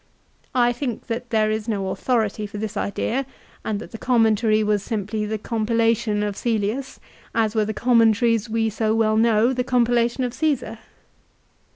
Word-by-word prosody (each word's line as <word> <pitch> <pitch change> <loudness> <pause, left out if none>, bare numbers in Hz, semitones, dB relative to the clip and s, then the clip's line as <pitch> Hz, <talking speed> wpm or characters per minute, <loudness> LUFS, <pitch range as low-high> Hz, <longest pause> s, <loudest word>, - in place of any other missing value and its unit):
I 245 -1 +3
think 245 -2 -4
that 240 +1 -4
there 215 -1 +2
is 215 +1 -3
no 200 -4 -1
authority 215 -2 -1
for 205 - -8
this 210 0 -4
idea, 240 +6 -1 0.4
and 215 - -2
that - - -10
the 225 - -8
commentary 220 -3 +2
was 210 -1 +1
simply 210 0 -3
the 220 +1 -2
compilation 225 -1 0
of 205 -1 -2
Cselius, 230 +4 -2 0.4
as 220 -2 +1
were 215 -2 +1
the 215 - -3
commentaries 230 -1 +3
we 225 0 +1
so 220 +1 0
well 220 -1 +2
know, 225 +2 +3
the 250 0 -1
compilation 240 0 +1
of 245 -1 -2
Ciesar. 280 -7 -1
225 Hz, 165 wpm, -22 LUFS, 215-240 Hz, 0.4 s, I